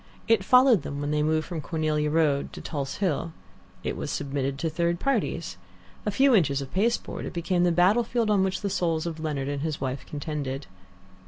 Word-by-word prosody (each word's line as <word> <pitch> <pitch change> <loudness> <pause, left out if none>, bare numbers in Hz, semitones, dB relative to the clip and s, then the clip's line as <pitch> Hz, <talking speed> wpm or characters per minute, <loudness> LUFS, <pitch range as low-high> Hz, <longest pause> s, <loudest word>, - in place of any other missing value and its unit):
It 225 -4 +4
followed 250 -1 +6
them 140 - -5
when 145 0 -2
they 150 0 +1
moved 155 0 +1
from 170 -3 -5
Cornelia 155 -2 0
Road 150 -3 +1
to - - -7
Tulse 140 -4 -4
Hill. 165 -4 -1 0.5
It - - -2
was - - -4
submitted 135 -1 -2
to 165 - -1
third 170 +2 0
parties. 185 - -1 0.5
A - - +4
few 265 +6 +4
inches 145 - +3
of 135 -1 -7
pasteboard, 230 +5 0
it - - -7
became 175 +1 +1
the 175 - +3
battlefield 215 +6 +3
on 200 -2 +4
which 190 -1 -1
the 200 - -1
souls 165 -4 0
of 165 -2 -4
Leonard 150 -4 -2
and 140 -1 -2
his 155 -1 -2
wife 130 0 -3
contended. 145 -2 -4
160 Hz, 195 wpm, -26 LUFS, 145-190 Hz, 0.5 s, followed